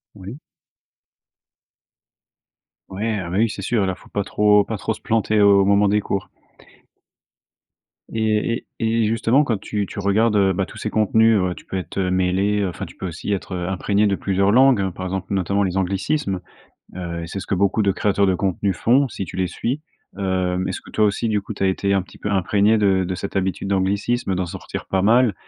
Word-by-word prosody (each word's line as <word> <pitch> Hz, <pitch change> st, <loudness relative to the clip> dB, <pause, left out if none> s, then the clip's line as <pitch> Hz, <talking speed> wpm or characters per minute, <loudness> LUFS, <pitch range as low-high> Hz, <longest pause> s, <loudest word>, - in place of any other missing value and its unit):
Oui. 100 Hz, +5 st, -9 dB, 2.5 s
Ouais, 105 Hz, +3 st, -2 dB
ah 90 Hz, -2 st, -5 dB
bah 95 Hz, -, -1 dB
oui, 115 Hz, +1 st, +3 dB
c'est 105 Hz, -, -6 dB
sûr! 110 Hz, +1 st, +1 dB
Alors 95 Hz, -1 st, -2 dB
faut -, -, -18 dB
pas 100 Hz, -, -2 dB
trop 105 Hz, +1 st, +3 dB
pas 110 Hz, +2 st, -4 dB
trop 95 Hz, -, -2 dB
se -, -, -13 dB
planter 110 Hz, -1 st, +1 dB
au 100 Hz, -1 st, +6 dB
moment 100 Hz, +1 st, +4 dB
des 105 Hz, +1 st, +2 dB
cours. 100 Hz, -1 st, -3 dB, 1.8 s
Et 110 Hz, +1 st, 0 dB
et 115 Hz, 0 st, +1 dB
et -, -, +2 dB
justement, 115 Hz, +5 st, +2 dB
quand 115 Hz, -8 st, -1 dB
tu 105 Hz, 0 st, -3 dB
tu -, -, -7 dB
regardes, 105 Hz, +3 st, +2 dB
heu, 95 Hz, -2 st, +3 dB
bah 95 Hz, +1 st, -1 dB
tous -, -, -12 dB
ces 110 Hz, -, -3 dB
contenus, 110 Hz, 0 st, +3 dB
heu, 90 Hz, -1 st, -1 dB
tu -, -, -14 dB
peux 95 Hz, -, -4 dB
être 95 Hz, -, -6 dB
heu 95 Hz, -2 st, 0 dB
mêlé, 95 Hz, +3 st, +1 dB
heu 100 Hz, -, 0 dB
enfin, 85 Hz, -, -6 dB
tu -, -, -14 dB
peux 95 Hz, -, -5 dB
aussi 90 Hz, +4 st, -5 dB
être, 95 Hz, -1 st, -4 dB
heu, 90 Hz, -1 st, -3 dB
imprégné 100 Hz, +2 st, +1 dB
de 100 Hz, -1 st, +2 dB
plusieurs 100 Hz, +1 st, +1 dB
langues, 120 Hz, -6 st, +4 dB
par 95 Hz, 0 st, -6 dB
exemple, 95 Hz, +1 st, -4 dB
notamment 100 Hz, +1 st, +1 dB
les 95 Hz, -2 st, -2 dB
anglicismes. 95 Hz, +3 st, -1 dB, 0.6 s
Heu, 85 Hz, -2 st, -5 dB
et -, -, -5 dB
c'est 100 Hz, -, -5 dB
ce -, -, -9 dB
que -, -, 0 dB
beaucoup 100 Hz, +3 st, +1 dB
de 100 Hz, -1 st, +2 dB
créateurs 100 Hz, 0 st, +1 dB
de 95 Hz, -, +2 dB
contenus 95 Hz, 0 st, -1 dB
font, 130 Hz, +7 st, +3 dB
si 100 Hz, -, -5 dB
tu 85 Hz, -, -9 dB
les 95 Hz, 0 st, +1 dB
suis. 130 Hz, -, -3 dB, 0.4 s
Heu 95 Hz, -2 st, 0 dB
mais 95 Hz, -, -2 dB
est-ce -, -, -4 dB
que -, -, -15 dB
toi 110 Hz, -, +2 dB
aussi, 105 Hz, +2 st, 0 dB
du 105 Hz, -2 st, +1 dB
coup, 105 Hz, -, -7 dB
tu 100 Hz, -, -6 dB
as -, -, +3 dB
été 100 Hz, +1 st, 0 dB
un 100 Hz, -1 st, +2 dB
petit 95 Hz, -, -16 dB
peu 105 Hz, -, -3 dB
imprégné 100 Hz, +3 st, +2 dB
de 95 Hz, -2 st, +2 dB
de 90 Hz, +1 st, -3 dB
cette 100 Hz, +2 st, -5 dB
habitude 95 Hz, 0 st, -1 dB
d'anglicisme, 100 Hz, +3 st, 0 dB
d'en 90 Hz, 0 st, -1 dB
sortir 85 Hz, -, -7 dB
pas 95 Hz, -1 st, 0 dB
mal. 115 Hz, +1 st, +4 dB
100 Hz, 220 wpm, -21 LUFS, 95-105 Hz, 2.5 s, au